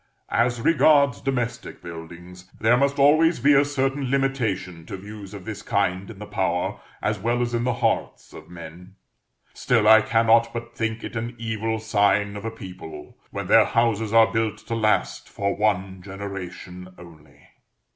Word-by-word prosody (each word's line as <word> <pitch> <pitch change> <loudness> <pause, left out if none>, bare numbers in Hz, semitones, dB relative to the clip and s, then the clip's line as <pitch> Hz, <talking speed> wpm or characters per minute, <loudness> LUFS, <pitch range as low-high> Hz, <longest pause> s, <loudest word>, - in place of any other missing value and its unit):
As 120 +1 +1
regards 140 - +4
domestic 125 -3 -3
buildings, 85 +2 -10
there 115 +2 +4
must 140 +2 +1
always 155 +3 +4
be 145 +4 +4
a 140 0 +5
certain 135 -1 -1
limitation 115 -11 -1
to - - -6
views 100 0 -10
of 100 -3 -10
this 105 -2 -6
kind 95 -2 -1
in 110 - -10
the 105 - -8
power, 95 -4 -2 0.2
as - - -1
well 120 +4 0
as 120 -1 -1
in 120 0 0
the 125 - +1
hearts, 115 -2 -2
of - - -12
men; 90 +2 -11 0.6
still 115 -4 +1
I 110 0 +8
cannot 115 +1 +3
but 115 0 -7
think 115 -1 -3
it - - -7
an 115 +2 -4
evil 110 0 -2
sign 100 -1 +1
of 105 +1 -7
a - - -1
people 90 -8 -10
when - - -5
their - - +6
houses 115 -2 0
are 115 0 +5
built 115 -1 0
to - - -4
last 110 -2 0
for 100 0 -2
one 95 -3 -1
generation 95 -1 -8
only. 80 -4 -17
110 Hz, 165 wpm, -23 LUFS, 95-120 Hz, 0.6 s, I